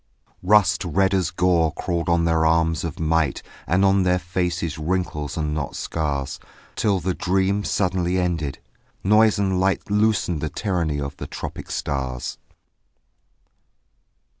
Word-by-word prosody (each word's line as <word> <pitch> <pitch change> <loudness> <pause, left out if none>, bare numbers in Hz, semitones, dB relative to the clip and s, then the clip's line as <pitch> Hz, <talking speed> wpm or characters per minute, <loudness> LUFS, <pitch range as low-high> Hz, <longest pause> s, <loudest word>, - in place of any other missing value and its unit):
Rust 105 +1 +4
red 95 +3 +1
as 95 -4 +1
gore 85 -2 +2
crawled 85 -2 -2
on 85 0 +3
their 80 -1 +2
arms 80 -1 +2
of 85 -3 -5
might 80 -2 +1 0.2
And 95 +3 +3
on 95 0 +4
their 90 0 +3
faces 85 -2 -2
wrinkles 80 -3 -2
and 75 -1 -1
not 75 -3 -3
scars: 70 -4 -3 0.4
Till 100 -3 +1
the 90 +2 -1
dream 95 +3 0
suddenly 90 -2 0
ended; 80 -6 -1 0.5
noise 105 +2 +4
and 95 -2 +1
light 95 +2 0
Loosened 105 -6 +1
the 80 - -2
tyranny 85 -5 -1
of 70 0 -5
the - - -6
tropic - - -7
stars. 65 -3 -3
85 Hz, 140 wpm, -23 LUFS, 80-95 Hz, 0.5 s, Rust